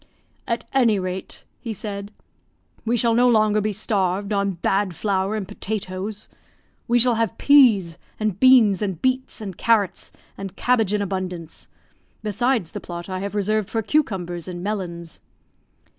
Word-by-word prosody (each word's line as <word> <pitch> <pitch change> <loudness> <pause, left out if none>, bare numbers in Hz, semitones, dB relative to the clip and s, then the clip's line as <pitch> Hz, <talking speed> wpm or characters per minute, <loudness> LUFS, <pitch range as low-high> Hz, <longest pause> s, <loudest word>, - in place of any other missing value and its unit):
"At 230 -1 -2
any 240 -6 +4
rate," 185 0 -5 0.2
he 230 -3 -5
said, 200 -1 -6 0.7
"we 235 +2 +1
shall 230 0 +2
no 245 +2 +4
longer 215 -2 +3
be 215 +1 0
starved 200 -1 -1
on 200 -1 +1
bad 190 +1 0
flour 195 +1 0
and 205 -3 -3
potatoes. 205 0 -5 0.6
We 240 0 +3
shall 240 0 +4
have 225 - -1
peas, 215 - +5 0.2
and 215 -3 -1
beans, 240 -7 +6
and 190 -6 -2
beets, 260 0 -1
and 195 -4 -6
carrots, 215 -3 +1 0.3
and 195 -1 -6
cabbage 225 -5 +2
in 210 -1 +1
abundance; 180 -4 -5 0.6
besides 215 -2 0
the - - -6
plot 175 +1 -7
I 185 0 -3
have 200 +2 -4
reserved 210 0 0
for 225 -1 -1
cucumbers 185 - -1
and 175 -1 -6
melons." 175 -5 -5
205 Hz, 150 wpm, -23 LUFS, 185-225 Hz, 0.7 s, beans